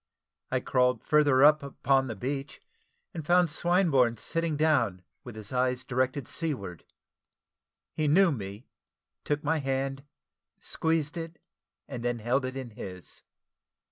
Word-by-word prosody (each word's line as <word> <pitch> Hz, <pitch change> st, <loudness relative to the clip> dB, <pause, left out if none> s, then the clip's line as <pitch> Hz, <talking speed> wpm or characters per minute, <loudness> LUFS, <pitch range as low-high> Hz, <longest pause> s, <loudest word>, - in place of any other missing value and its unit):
I -, -, 0 dB
crawled 125 Hz, -2 st, +1 dB
further 145 Hz, -3 st, +4 dB
up 150 Hz, +1 st, +7 dB
upon 135 Hz, -1 st, +1 dB
the 115 Hz, -, -4 dB
beach, 135 Hz, +6 st, -4 dB, 0.5 s
and 160 Hz, -, -5 dB
found 175 Hz, +1 st, +3 dB
Swinburne 160 Hz, -9 st, +2 dB
sitting 165 Hz, +5 st, -1 dB
down 120 Hz, -, +2 dB, 0.2 s
with 120 Hz, -3 st, -9 dB
his 110 Hz, +2 st, -8 dB
eyes 125 Hz, 0 st, 0 dB
directed 130 Hz, 0 st, -1 dB
seaward. 110 Hz, -, -4 dB, 1.1 s
He 155 Hz, -, -1 dB
knew 175 Hz, +4 st, +5 dB
me, 105 Hz, -2 st, -6 dB, 0.6 s
took 145 Hz, 0 st, -1 dB
my 160 Hz, +2 st, +1 dB
hand, 135 Hz, 0 st, -2 dB, 0.6 s
squeezed 160 Hz, -1 st, -1 dB
it, 165 Hz, 0 st, -6 dB, 0.5 s
and 125 Hz, -4 st, -6 dB
then 120 Hz, 0 st, 0 dB
held 125 Hz, +4 st, 0 dB
it 130 Hz, 0 st, -5 dB
in 130 Hz, -3 st, -6 dB
his. 90 Hz, -4 st, -9 dB
135 Hz, 135 wpm, -28 LUFS, 120-155 Hz, 1.1 s, up